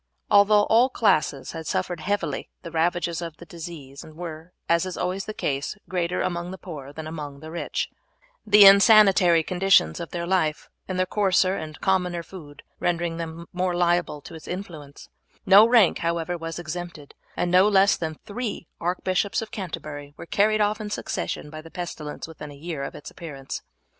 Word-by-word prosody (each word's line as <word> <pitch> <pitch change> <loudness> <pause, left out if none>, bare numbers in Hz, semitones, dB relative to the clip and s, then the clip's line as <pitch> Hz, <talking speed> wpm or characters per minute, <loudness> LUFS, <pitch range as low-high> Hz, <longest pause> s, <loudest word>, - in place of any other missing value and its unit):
Although 205 0 +6
all 235 +5 +4
classes 155 - +1
had 160 -2 -7
suffered 185 -1 -2
heavily 205 +6 -2
the 170 - -7
ravages 170 +1 0
of 165 -2 -6
the 170 - -12
disease 155 -5 -9
were, 160 +1 -9 0.2
as 170 0 +3
is 185 - -6
always 185 +2 -2
the - - -4
case, 140 +6 -2
greater 180 -1 -1
among 175 0 -2
the 190 - -7
poor 145 -7 -9
than 155 +2 -8
among 150 -3 -7
the 160 +2 -9
rich, 170 - -2 0.6
the 210 -1 +7
insanitary 195 -4 +7
conditions 180 - +3
of 170 - -6
their 170 -1 -4
life, 170 -4 0 0.2
and 185 - -3
their 185 - +2
coarser 190 -1 +2
and 155 -4 -7
commoner 180 -3 +1
food 150 -6 -12 0.2
rendering 170 -1 -1
them 165 0 -6
more 180 0 0
liable 175 -3 +1
to 170 - -11
its 160 - -11
influence; 165 -6 -8 0.4
no 200 +3 +8
rank, 230 -6 +5
however, 170 +1 -1
was 165 -1 -6
exempted, 175 -3 -7 0.2
and 175 - 0
no 185 +3 +6
less 195 -1 +5
than 160 -2 -4
three 215 -5 -5
Archbishops 185 +3 0
of 225 - -6
Canterbury 155 -8 -7
were - - -8
carried 215 +4 +2
off 210 +1 +1
in 210 - -5
succession 150 -6 -4
by 155 0 -7
the 165 - -13
pestilence 165 -5 -6
within 150 -2 -9
a 145 - -11
year 155 0 -5
of 140 - -6
its 150 - -9
appearance. 140 -5 -7
175 Hz, 180 wpm, -25 LUFS, 160-190 Hz, 0.6 s, no